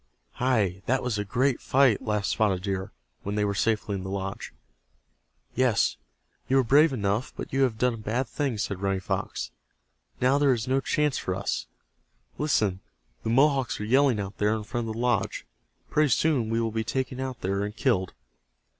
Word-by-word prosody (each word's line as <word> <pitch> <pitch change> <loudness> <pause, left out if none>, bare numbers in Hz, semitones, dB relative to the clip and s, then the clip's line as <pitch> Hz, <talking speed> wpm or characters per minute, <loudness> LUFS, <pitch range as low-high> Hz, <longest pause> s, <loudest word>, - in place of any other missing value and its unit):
"Hi, 105 -8 +1
that 130 +2 +1
was 120 -4 -1
a - - 0
great 125 +5 0
fight," 130 -5 +3
laughed 105 -2 -1
Spotted 95 -4 +1
Deer, 95 -1 -3 0.3
when 100 +1 -4
they 105 -1 +1
were 100 - 0
safely 105 0 0
in 95 - -3
the 95 - -6
lodge. 95 0 -4 1.0
"Yes, 125 -4 +2 0.5
you 135 - +3
were 135 - +4
brave 145 +6 +5
enough 105 0 -1
but - - -7
you 135 - +2
have 125 -5 +2
done 125 +1 +2
a - - -6
bad 115 +4 -2
thing," 135 -3 -2
said 100 -2 -3
Running 95 -1 0
Fox. 95 - -3 0.7
"Now 130 +3 +3
there 140 -2 +4
is 120 0 -3
no 135 +1 +2
chance 150 0 +1
for 95 - -2
us. 95 -10 -2 0.7
Listen, 105 -11 +1 0.4
the - - -3
Mohawks 135 +1 +3
are 105 - -3
yelling 130 0 +3
out 100 0 -5
there 105 +1 +2
in 110 - -4
front 120 +1 -3
of 110 - -4
the - - -5
lodge. 125 0 0 0.5
Pretty 150 -1 +3
soon 130 -3 +2
we 115 0 +1
will 115 -1 0
be 110 0 -1
taken 130 +2 -2
out 130 -2 -4
there 100 +2 -1
and 105 +1 -4
killed." 100 -10 0
115 Hz, 190 wpm, -27 LUFS, 100-130 Hz, 1.0 s, brave